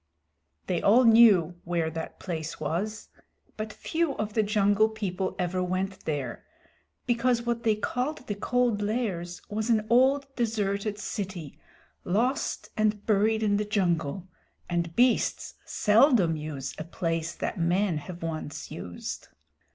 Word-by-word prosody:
They 175 -2 -1
all 230 +6 +6
knew 210 -8 +6
where 170 -2 -1
that 160 0 -6
place 160 -4 -5
was, 185 +8 -3 0.5
but 215 0 -4
few 320 +3 -1
of 215 0 -3
the 220 - +3
Jungle 205 +1 +3
People 190 -4 -3
ever 185 0 -1
went 185 +2 -2
there, 140 -6 -3 0.6
because 240 0 +1
what 235 -1 -1
they 220 -2 +2
called 250 +6 -3
the 205 - -2
Cold 235 +1 +1
Lairs 200 -6 -2
was 215 +2 -3
an 215 -2 +3
old 265 +3 +4
deserted 210 -3 -1
city, 190 -7 -5 0.4
lost 240 +9 0
and 215 -1 0
buried 220 +1 +2
in 205 -1 +2
the 210 - 0
jungle, 180 -4 -1 0.4
and 170 -1 -2
beasts 245 0 +2
seldom 210 - +4
use 150 -3 -5
a - - -3
place 165 -1 -2
that 200 - -3
men 175 0 +1
have 175 +2 -9
once 155 -3 -5
used. 85 0 -6
205 Hz, 135 wpm, -27 LUFS, 170-220 Hz, 0.6 s, all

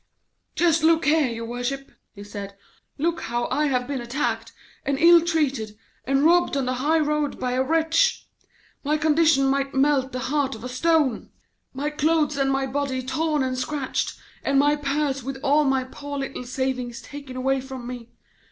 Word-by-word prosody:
'Just 335 -2 +3
look 325 +1 +3
here, 300 -1 +4
your 230 -1 -5
worship,' 245 +4 -4 0.2
he 200 - -9
said, 200 -1 -8 0.4
'look 335 +3 -1
how 240 +1 -2
I 300 +1 +2
have 250 -3 0
been 275 -3 -3
attacked, 235 -2 -2 0.3
and 275 0 0
ill 335 +2 +7
treated, 275 -11 -1 0.3
and 275 +3 +2
robbed 345 -3 +4
on 270 - 0
the 255 - 0
high 310 +4 +3
road 300 -1 0
by 250 - -1
a 255 +1 +1
wretch. 325 - +2 0.6
My 300 +1 +1
condition 310 -2 +3
might 275 0 0
melt 270 -1 +2
the 255 - -4 0.2
heart 280 -4 +1
of 220 - -11
a 250 - -5
stone; 285 -2 +1 0.4
my 285 +3 -3
clothes 300 0 +1
and 275 -1 +1
my 270 0 0
body 265 -1 -2
torn 305 +2 0
and 260 0 -1
scratched, 265 +1 -2 0.3
and 275 - +1
my 290 +2 +4
purse 280 -1 -1
with 270 +2 -5
all 295 +2 +3
my 270 -1 +2
poor 285 +2 -7
little 270 -2 -5
savings 250 -1 -3
taken 280 -3 -9
away 265 +1 0
from 260 -2 -8
me. 245 -1 -7
275 Hz, 180 wpm, -24 LUFS, 255-300 Hz, 0.6 s, ill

